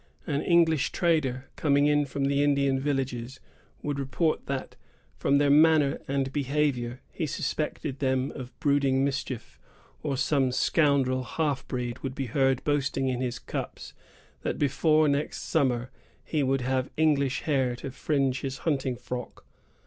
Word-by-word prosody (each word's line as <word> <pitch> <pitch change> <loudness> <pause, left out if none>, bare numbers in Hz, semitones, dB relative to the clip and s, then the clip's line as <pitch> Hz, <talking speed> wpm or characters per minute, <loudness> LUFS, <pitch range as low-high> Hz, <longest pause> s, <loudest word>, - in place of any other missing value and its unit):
An 145 -1 -1
English 165 -4 +3
trader, 145 -7 +1
coming 145 -1 +3
in 145 0 +3
from 140 +1 -2
the 140 +1 +2
Indian 140 -2 +2
villages, 135 -3 -2 0.4
would 145 -1 -2
report 155 +4 -1
that, 135 -1 -4 0.4
from 140 - +2
their 145 0 +3
manner 150 -1 +5
and 135 -1 -1
behavior, 135 -3 -1
he 160 - -3
suspected 150 0 -3
them 130 0 0
of 130 -3 -9
brooding 140 -2 +2
mischief; 135 -3 -4 0.4
or 140 -2 -2
some 135 -2 +2
scoundrel 135 -2 +2
half 145 +1 -2
breed 120 -1 -3
would 135 -1 -5
be 135 - -2
heard 135 +1 +1
boasting 135 -2 0
in 125 -1 -2
his 125 -2 -2
cups - - -6 0.5
that - - -2
before 155 +2 +3
next 145 +1 -1
summer 125 -5 0 0.3
he 155 - -1
would 135 -1 +1
have 130 +1 0
English 140 -4 +2
hair 130 -5 +1
to 130 +2 -7
fringe 135 -1 0
his 135 -1 -4
hunting 135 -5 0
frock. 125 0 -7
135 Hz, 150 wpm, -27 LUFS, 130-145 Hz, 0.5 s, manner